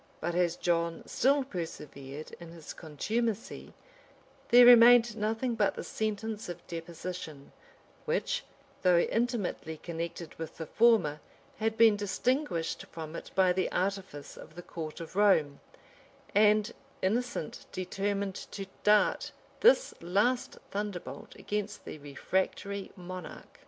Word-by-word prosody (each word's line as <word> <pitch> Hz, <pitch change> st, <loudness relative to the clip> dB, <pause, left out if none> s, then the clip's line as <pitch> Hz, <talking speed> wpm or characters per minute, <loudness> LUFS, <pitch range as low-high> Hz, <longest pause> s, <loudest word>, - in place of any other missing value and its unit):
But 175 Hz, -, -2 dB
as 175 Hz, -1 st, +2 dB
John 170 Hz, -1 st, 0 dB
still 275 Hz, +3 st, +2 dB
persevered 150 Hz, -, -7 dB
in 170 Hz, -1 st, -10 dB
his 165 Hz, -3 st, -9 dB
contumacy, 215 Hz, -, -3 dB, 0.8 s
there 245 Hz, +1 st, +9 dB
remained 240 Hz, -1 st, +8 dB
nothing 225 Hz, +3 st, -1 dB
but 210 Hz, -3 st, +1 dB
the -, -, -5 dB
sentence 215 Hz, -1 st, -3 dB
of 175 Hz, -, -7 dB
deposition; 165 Hz, -3 st, -7 dB, 0.5 s
which, -, -, -1 dB, 0.4 s
though 180 Hz, -1 st, +5 dB
intimately 215 Hz, -6 st, -1 dB
connected 170 Hz, 0 st, -6 dB
with 160 Hz, -1 st, -6 dB
the 160 Hz, -, -5 dB
former 190 Hz, -7 st, +3 dB, 0.4 s
had 220 Hz, 0 st, -1 dB
been 225 Hz, -2 st, +7 dB
distinguished 205 Hz, -, -1 dB
from 160 Hz, 0 st, -8 dB
it -, -, -7 dB
by 185 Hz, -1 st, +4 dB
the 185 Hz, +1 st, -1 dB
artifice 190 Hz, -6 st, -3 dB
of 155 Hz, -, -12 dB
the 175 Hz, -, -8 dB
court 160 Hz, -1 st, -7 dB
of 165 Hz, -, -9 dB
Rome; 185 Hz, -9 st, +3 dB, 0.7 s
and 210 Hz, 0 st, +4 dB, 0.3 s
Innocent 230 Hz, -3 st, -2 dB
determined 195 Hz, +1 st, -3 dB
to 195 Hz, -, -5 dB, 0.2 s
dart 210 Hz, 0 st, +3 dB, 0.3 s
this -, -, +5 dB
last 205 Hz, +9 st, +1 dB
thunderbolt 190 Hz, -9 st, -5 dB
against 210 Hz, 0 st, -4 dB
the 155 Hz, -, -7 dB
refractory 190 Hz, +7 st, -2 dB
monarch. 180 Hz, -1 st, -9 dB
190 Hz, 120 wpm, -30 LUFS, 165-220 Hz, 0.8 s, there